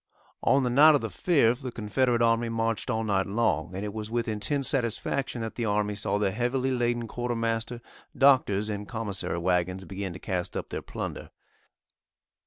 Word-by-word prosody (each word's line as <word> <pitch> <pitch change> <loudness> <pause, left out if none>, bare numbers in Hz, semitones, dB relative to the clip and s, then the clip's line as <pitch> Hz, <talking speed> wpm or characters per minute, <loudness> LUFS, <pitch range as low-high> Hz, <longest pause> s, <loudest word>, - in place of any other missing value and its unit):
On 135 0 +3
the 125 - 0
night 150 +4 +7
of 145 - +1
the - - -3
5th 130 -8 +2
the 130 -2 -5
Confederate 120 +2 +1
army 115 0 +2
marched 115 -1 -1
all 110 0 0
night 100 -3 +1
long, 100 -5 0
and 100 +2 -3
it 105 - -5
was 110 -1 -5
with 120 0 -1
intense 115 +6 -1
satisfaction 125 0 -1
that 115 -1 -4
the 120 - -3
army 105 0 0
saw 100 0 -1
the 100 -2 +1
heavily 125 +4 0
laden 120 -2 0
Quartermaster, 115 0 -2 0.4
Doctors' 125 -7 +4
and 105 -1 -4
Commissary 105 -6 -3
wagons 90 +2 0
begin 95 +1 -5
to - - -7
cast 90 -1 -3
up - - -5
their - - -4
plunder. - - -6
115 Hz, 180 wpm, -27 LUFS, 100-120 Hz, 0.4 s, night